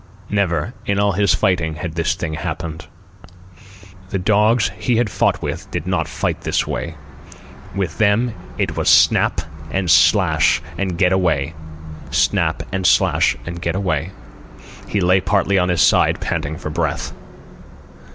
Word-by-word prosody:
Never, 100 -1 0
in 100 - +1
all 100 0 +3
his 100 -1 +2
fighting, 85 -4 0
had 80 +1 -5
this 85 0 0
thing 85 -2 -4
happened. 80 0 -5 1.2
The 100 - -2
dogs 105 +4 +2
he 125 - 0
had 115 -3 +1
fought - - 0
with - - -5
did 85 -2 -4
not 90 -4 -1
fight - - -3
that - - 0
way. 85 -1 -4 0.8
With 95 -5 -3
them 110 +3 +2 0.2
it - - -1
was - - +1
snap - - +4 0.3
and 95 +1 0
slash 85 -1 +4 0.2
and 90 -1 -2
get 90 0 +3
away, 80 -5 0 0.6
snap - - +1
and 95 -1 0
slash 60 - +3
and 85 0 -6
get 95 - -2
away. 90 -4 -1 0.8
He 100 - -1
lay 90 +1 +3
partly 100 -1 +1
on 90 0 +1
his 90 -2 +3
side, - - +3
panting 75 +2 -3
for 75 - -6
breath. 80 -2 -2
90 Hz, 150 wpm, -19 LUFS, 80-100 Hz, 1.2 s, snap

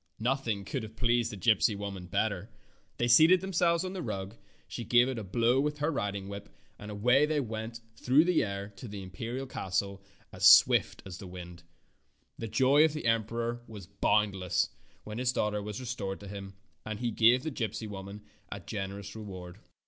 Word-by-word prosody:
Nothing 115 -4 -1
could 130 +6 -3
have 110 0 -9
pleased 120 0 +1
the 105 - -7
gypsy 105 +2 +3
woman 100 -3 -6
better. 100 +1 -1 0.5
They 120 - +1
seated 160 +9 +7
themselves 175 -2 +1
on 185 - -4
the 190 - -4
rug, 95 - -5 0.3
she 120 - -6
gave 120 +2 +4
it 130 -3 -3
a - - -5
blow 120 +6 +2
with 150 +1 -1
her 150 +2 0
riding 100 -7 -3
whip, 100 0 -8 0.3
and 105 - -8
away 125 +8 +3
they 155 -1 +1
went 115 -2 -5
through 140 +6 +4
the 180 -2 +3
air 100 -1 -4
to 125 - -8
the 100 -2 -7
imperial 115 +8 -5
castle 100 -4 -3 0.3
as - - +4
swift - - +6
as 90 -3 -8
the 100 - -8
wind. 90 -1 -9 0.8
The 115 - -4
joy 130 +6 +4
of 160 -2 +3
the 155 - -5
emperor 115 +1 0
was 105 -4 -9
boundless 95 -2 +1 0.3
when 110 +2 -6
his 125 0 +1
daughter 105 -4 -1
was 105 +2 -6
restored 110 -6 -4
to 100 - -9
him, 100 -1 -8 0.3
and 110 -1 -5
he 120 -1 -1
gave 120 +4 +4
the 160 - -3
gypsy 110 -4 -3
woman 100 +1 -8 0.3
a 100 - -5
generous 100 +1 -6
reward. 95 -3 -8
110 Hz, 185 wpm, -30 LUFS, 100-125 Hz, 0.8 s, seated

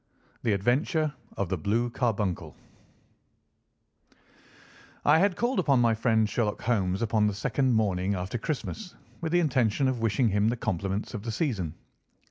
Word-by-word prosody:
THE 115 - +1
ADVENTURE 145 - +1 0.2
OF 100 -3 -1
THE 95 -2 -1
BLUE 115 +8 0
CARBUNCLE 105 -8 -1 2.5
I 150 +2 +6
had 195 0 +3
called 240 +3 0
upon 140 -7 +3
my 115 -1 +4
friend 110 -1 +2
Sherlock 105 -1 -1
Holmes 100 -3 0
upon 110 -2 +2
the 105 - -1
second 130 +5 +1
morning 100 -2 +1
after 95 +6 -3
Christmas, 160 - -4 0.3
with 160 -1 -2
the 175 - +4
intention 130 -4 +2
of 130 -3 -1
wishing 115 +2 +2
him 105 +1 +2
the 120 - -1
compliments 100 -1 -2
of 105 - -4
the 115 +2 -4
season. 105 - -2
115 Hz, 150 wpm, -28 LUFS, 100-130 Hz, 2.5 s, I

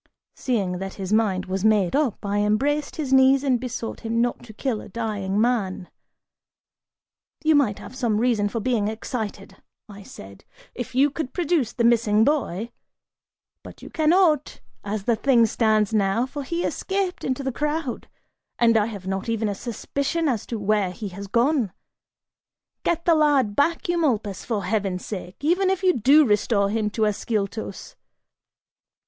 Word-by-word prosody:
Seeing 195 -8 -1
that 195 0 -6
his 195 0 -4
mind 200 -4 +1
was 190 0 -3
made 215 -2 +3
up, 275 -8 0
I 205 +1 0
embraced 280 +8 0
his 280 -4 -2
knees 265 +1 +5
and 260 -3 +2
besought 240 -2 -5
him 230 0 -2
not 240 +1 0
to 230 - -11
kill 220 0 -3
a - - -11
dying 205 -3 -2
man. 215 -6 0 1.5
"You 315 0 +4
might 270 -9 +2
have 255 - -11
some 235 -5 0
reason 220 -3 +1
for 230 - -3
being 220 -2 0
excited," 220 0 -5 0.3
I 205 -2 -11
said, 100 - -12 0.3
"if 245 0 -6
you 280 +2 +4
could 280 -2 -5
produce 330 - +1
the 235 - -2
missing 225 -2 +4
boy, 235 - 0 0.9
but - - -13
you - - -10
cannot, 315 -2 +2 0.2
as 205 0 -3
the 235 +2 +2
thing 235 0 +4
stands 220 -1 +1
now, 210 +3 +2
for 285 +2 -6
he 335 +5 -3
escaped 385 -2 -2
into 260 +1 -2
the 265 - -1
crowd 295 0 -3 0.5
and 230 -1 +4
I 210 0 +2
have 200 -5 -8
not 190 +3 -3
even 225 -1 0
a 205 - -1
suspicion 280 - -2
as 240 -7 -1
to 230 - -3
where 205 -2 +1
he 200 +3 -6
has 200 +2 -8
gone! 240 - +1 1.1
Get 335 -1 -1
the 340 - +5
lad 285 -9 +3
back, 330 +4 +1
Eumolpus, 245 - 0
for 215 -4 -2
heaven's 190 -2 -2
sake, 185 -3 -6
even 360 +6 +2
if 380 0 -1
you 370 -1 +4
do 280 +5 +5
restore 205 -2 +2
him 215 -1 0
to 220 +1 -2
Ascyltos!" 210 0 -3
230 Hz, 165 wpm, -24 LUFS, 205-275 Hz, 1.5 s, knees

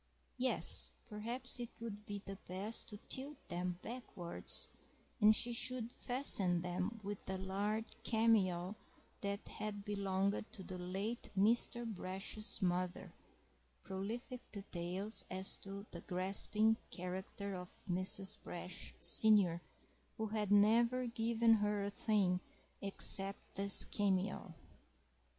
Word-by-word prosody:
Yes, 255 +1 +5
perhaps 240 +4 -3
it 240 -1 -4
would 215 -2 -7
be 205 -1 -5
the 195 0 -6
best 195 +5 -2
to 210 - -8
tilt 275 +2 -4
them 180 0 -2
backwards, 215 -8 0 0.5
and 215 0 +7
she 240 +2 0
should 240 -1 0
fasten 205 -10 +1
them 185 +5 -2
with 205 -1 -6
a 190 - -1
large 200 +4 -1 0.2
cameo 205 -5 +2 0.5
that 200 0 -3
had 205 -1 -5
belonged 200 -1 0
to 200 -5 -8
the 185 0 -7
late 195 +6 -3
Mr. 235 +3 +4
Brash's 200 +1 -3
mother 180 0 -1 0.7
(prolific 225 +6 -5
details 195 +1 -3
as 190 +1 -2
to 200 +1 -8
the 170 - -7
grasping 200 +4 +1
character 190 +2 -5
of 180 -1 -6 0.2
Mrs. 185 +1 +5
Brash, 180 +1 -6
senior, 200 -6 +6 0.6
who 220 - -1
had 210 -2 -1
never 235 +5 +5
given 230 0 +3
her 210 -1 0
a 200 - -2
thing 200 -4 +1 0.4
except 195 0 0
this 200 0 +1
cameo). 195 -3 -1
200 Hz, 120 wpm, -37 LUFS, 185-225 Hz, 0.7 s, and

